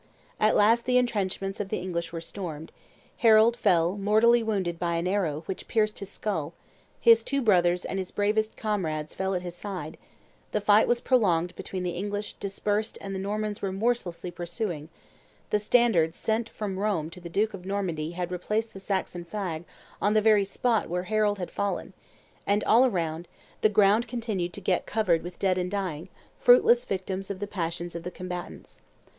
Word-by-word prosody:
At 215 0 +4
last 230 +3 +4
the 250 0 +4
intrenchments 195 -5 -1
of 200 -2 -3
the 215 - -1
English 175 -2 -3
were 165 -1 -5
stormed; 165 -4 -7 0.5
Harold 225 -2 +6
fell 180 -5 +2
mortally 220 +4 +4
wounded 190 -6 -1
by 170 -1 0
an 170 +2 -1
arrow 170 -6 0
which 190 - -6
pierced 215 -1 +1
his 200 - -7
skull; 170 -7 -3 0.5
his 230 -1 +6
two 275 +3 -1
brothers 180 -7 +3
and 195 - -3
his 185 - -4
bravest 215 +1 0
comrades 160 -8 -2
fell 190 0 -1
at 180 - -2
his 175 -1 -5
side; 175 -4 -6 0.5
the - - +2
fight 210 +1 +5
was 240 0 +1
prolonged 180 -9 +2
between 185 -1 -5
the 180 - -1
English 205 +3 -4
dispersed 205 +2 -2
and 195 0 -6
the 190 - -3
Normans 210 +1 -3
remorselessly 195 -3 -1
pursuing; 175 -2 -4 0.6
the 210 - +3
standard 210 -7 +3
sent 225 +1 -1
from 195 -3 -4
Rome 190 -7 -1
to 180 - -11
the 170 - -8
duke 210 +5 0
of 190 -2 -8
Normandy 175 -5 -2
had 180 0 -4
replaced 210 +5 -2
the 195 - -8
Saxon 190 -2 -3
flag 175 -3 -4 0.4
on 210 +1 +2
the - - +6
very 210 -2 +4
spot 225 +2 0
where 180 +1 -1
Harold 210 +1 +1
had 180 -2 -5
fallen; 200 0 -3 0.5
and, 205 +1 +2
all 245 +4 +5
around, 170 -5 -2 0.3
the 215 - +5
ground 210 +3 +4
continued 220 -7 -3
to 200 - -7
get 180 -1 0
covered 185 -7 +2
with 175 0 -8
dead 185 -2 +1
and 180 0 -2
dying, 185 -4 -3 0.3
fruitless 245 -1 +6
victims 190 0 -3
of 200 - -3
the 205 - -3
passions 175 -3 -3
of 170 - -5
the 175 - -5
combatants. 180 -1 -8
195 Hz, 180 wpm, -27 LUFS, 175-215 Hz, 0.6 s, Harold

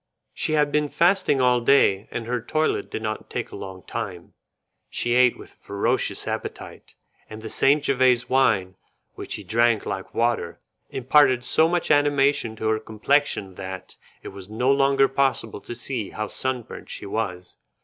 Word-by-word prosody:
She 155 - 0
had 150 -1 +2
been 150 0 +1
fasting 175 -4 +2
all 125 -1 +3
day, 115 -6 +3
and 115 - -5
her 120 +1 -2
toilet 155 +6 -1
did 110 - -5
not 110 0 -4
take - - -4
a - - -8
long 95 -1 -8
time. 95 -7 -6 0.6
She 120 - 0
ate 125 0 +4
with - - -13
a - - -33
ferocious 100 0 -1
appetite, - - -6 0.3
and 110 0 -9
the 110 - -5
St. 140 +2 +3
Jevese 130 -3 +2
wine, 95 -8 +2 0.4
which - - -7
she 105 - -5
drank 115 +2 +2
like 95 - -5
water, 115 -7 0 0.3
imparted 130 -1 +3
so 160 +5 +4
much 175 -2 0
animation 145 -5 +2
to 110 0 -3
her 110 0 +1
complexion 110 -2 0
that 95 -1 -8 0.3
it - - -7
was 95 0 -10
no 125 +5 +1
longer 135 0 +3
possible 135 -6 -1
to 120 - -8
see 120 -4 -4
how 110 - -4
sunburnt 125 +1 -4
she - - -6
was. 90 -4 -4
120 Hz, 170 wpm, -24 LUFS, 110-140 Hz, 0.6 s, ate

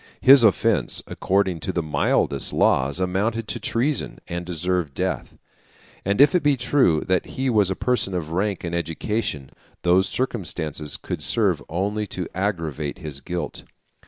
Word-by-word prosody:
His 135 -1 +8
offence, 110 -4 +2
according 95 -3 0
to 95 - -3
the 85 -2 -1
mildest 70 -2 +1
laws, 70 +5 +2
amounted 105 +5 -1
to - - -3
treason, 135 +6 -1
and 85 0 -4
deserved 90 -3 -2
death. - - -3 0.7
And 100 +1 0
if 145 +1 +7
it 180 - +3
be 145 -2 +2
true 120 - +3
that 90 -1 0
he 130 0 +1
was 105 -4 +3
a 95 - -1
person 120 -6 0
of 80 -3 -3
rank 100 +3 -1
and 85 -1 -4
education, 85 -2 -2 0.3
those 90 +2 +3
circumstances 80 - -3
could - - -5
serve - - +2
only 100 +5 -2
to 90 -2 -4
aggravate 80 -7 -2
his 75 -3 -7
guilt. 90 +5 -5
95 Hz, 155 wpm, -23 LUFS, 80-110 Hz, 0.7 s, His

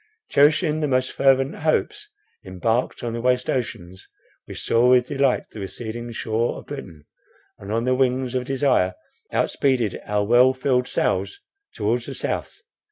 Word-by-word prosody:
Cherishing 150 +2 +3
the 150 - 0
most 130 -1 +1
fervent 135 +1 +2
hopes, 415 - -1 0.3
embarked 110 +8 -2
on 120 -1 -3
the 115 - -3
waste 125 0 +1
ocean, 105 -8 -3 0.5
we - - -8
saw 120 +2 +2
with 125 -1 +5
delight 135 -1 0
the 110 - -9
receding 120 +4 -6
shore 115 +1 -1
of - - -11
Britain, 85 - -9 0.5
and 100 +1 -8
on 115 +2 0
the 130 - +2
wings 130 -1 0
of 125 -1 -1
desire 130 -9 +1 0.4
outspeeded 125 -8 0
our 105 0 +1
well 125 +4 +5
filled 125 -1 +1
sails 395 - -1 0.4
towards - - -1
the - - -6
South. - - -4
125 Hz, 155 wpm, -23 LUFS, 115-135 Hz, 0.5 s, with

